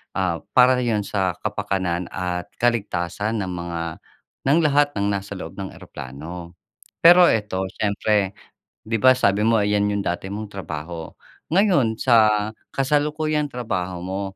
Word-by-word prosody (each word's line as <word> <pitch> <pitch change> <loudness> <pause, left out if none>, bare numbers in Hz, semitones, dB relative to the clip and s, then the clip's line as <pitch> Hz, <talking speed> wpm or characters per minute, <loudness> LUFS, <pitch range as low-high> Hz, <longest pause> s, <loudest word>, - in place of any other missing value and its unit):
ah, 90 -4 0
para 125 0 +6
'yon 110 -4 0
sa 95 -3 0
kapakanan 90 -2 -2
at 90 0 -4
kaligtasan 110 -2 -1
ng 95 - -4
mga 85 -1 -4 0.7
ng 155 - +5
lahat 145 -1 +3
ng 100 - +1
nasa 100 +1 -6
loob 80 -3 -8
ng 95 -1 -6
eroplano. 85 +7 -9 0.5
Pero 175 +1 +9
ito 105 -3 -1
siyempre, 105 -1 +1 0.5
‘di 115 +1 0
ba, 130 +3 +7
sabi 100 -4 +2
mo 115 0 +4
'yan 105 0 +2
'yong 100 - -1
dati 90 +2 -2
mong 105 0 -5
trabaho. 80 -3 -6 0.4
Ngayon 165 - +3
sa 110 -4 +4 0.2
kasalukuyang 150 +2 0
trabaho 95 -8 -3
mo, 95 +2 -4
105 Hz, 140 wpm, -22 LUFS, 90-120 Hz, 0.7 s, Pero